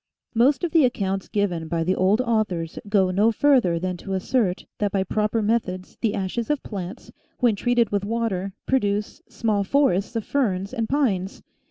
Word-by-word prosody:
Most 255 +8 +3
of 345 - 0
the 325 -2 +5
accounts 195 -6 0
given 180 -6 -1
by 165 0 -1
the 180 +3 +1
old 190 +5 +2
au 225 -2 +3
thors 165 -5 -5
go 195 -3 +3
no 205 +5 +3
further 240 -8 +3
than 180 +1 -3
to 195 +3 -6
assert 190 -1 0
that 205 -1 0
by 195 -1 +1
proper 215 +3 0
methods 205 -4 -1
the 225 -3 +1
ashes 200 +6 -3
of 295 -2 0
plants, 190 -2 -7 0.3
when 240 -4 +3
treated 240 +1 +1
with 200 -1 0
water, 200 -3 -2
produce 210 -5 0
small 210 -3 0
forests 205 -3 +1
of 225 - -1
ferns 200 -8 -1
and 230 -3 -2
pines. 205 -10 0
205 Hz, 180 wpm, -24 LUFS, 190-235 Hz, 0.3 s, the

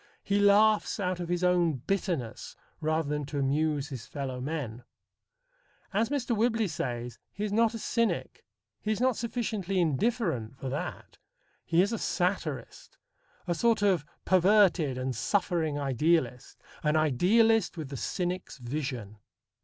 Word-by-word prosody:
He 200 0 +1
laughs 210 +2 +4
out 180 -2 -1
of 175 -1 -4
his 175 0 0
own 175 -2 +3
bitterness 160 - -3 0.2
rather 155 0 0
than 150 0 -1
to 145 - -5
amuse 145 +1 0
his 125 -6 -7
fellow 130 -3 -5
men. 130 -5 -4 1.1
As 225 +4 +1
Mr. 260 -4 0
Whibley 225 0 +2
says, 120 -7 -4
he 205 - -5
is 210 -1 -2
not 230 +1 +3
a - - -2
cynic. 230 0 -1 0.4
He 215 - -1
is 215 - -1
not 255 -1 +2
sufficiently 220 -5 -2
indifferent 160 - 0
for 135 - -5
that. 140 +3 -5 0.4
He 170 +1 +3
is 205 +4 -1
a 225 - -2
satirist, 175 -6 -2 0.5
a 175 - 0
sort 225 +4 +2
of 190 -7 +3 0.2
perverted 185 -7 +4
and 130 0 -2
suffering 160 - 0
idealist: 140 -1 0 0.2
an 150 0 +1
idealist 190 - +3
with 155 -4 -5
the 140 - -6
cynic's 180 +5 -3
vision. 120 -5 -5
170 Hz, 145 wpm, -29 LUFS, 140-205 Hz, 1.1 s, laughs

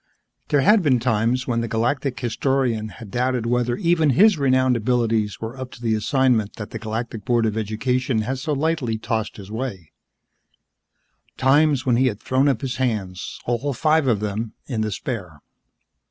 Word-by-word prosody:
There 145 - +3
had 210 +9 +5
been 135 -7 +3
times 120 +1 +1
when 115 -2 0
the 115 - -2
Galactic 125 +3 -1
Historian 120 -2 0
had 110 -1 -11
doubted 125 -1 0
whether 120 0 +1
even 165 -3 +2
his 200 - +5
renowned 130 -3 +2
abilities 115 -3 0
were 115 +2 -6
up 130 -1 -6
to - - -12
the 115 -1 +1
assignment 110 -1 +1
that 105 -3 -7
the 115 - -5
Galactic 110 0 -4
Board 120 0 +2
of 110 -1 -1
Education 110 +3 -1
had 130 +3 -3
so 150 +3 -2
lightly 145 -6 0
tossed 110 0 -3
his 100 0 -10
way, 110 -9 -5 1.5
times 140 0 +3
when 125 -2 +3
he 130 +1 +3
had 105 -4 -2
thrown 130 +4 +2
up 130 -5 0
his 130 -2 -3
hands 105 -8 -3
all 125 +4 -1
five 155 +3 +2
of 110 -5 +2
them 105 +1 -3
in 115 -5 -3
despair. 105 - -4
120 Hz, 170 wpm, -22 LUFS, 110-130 Hz, 1.5 s, had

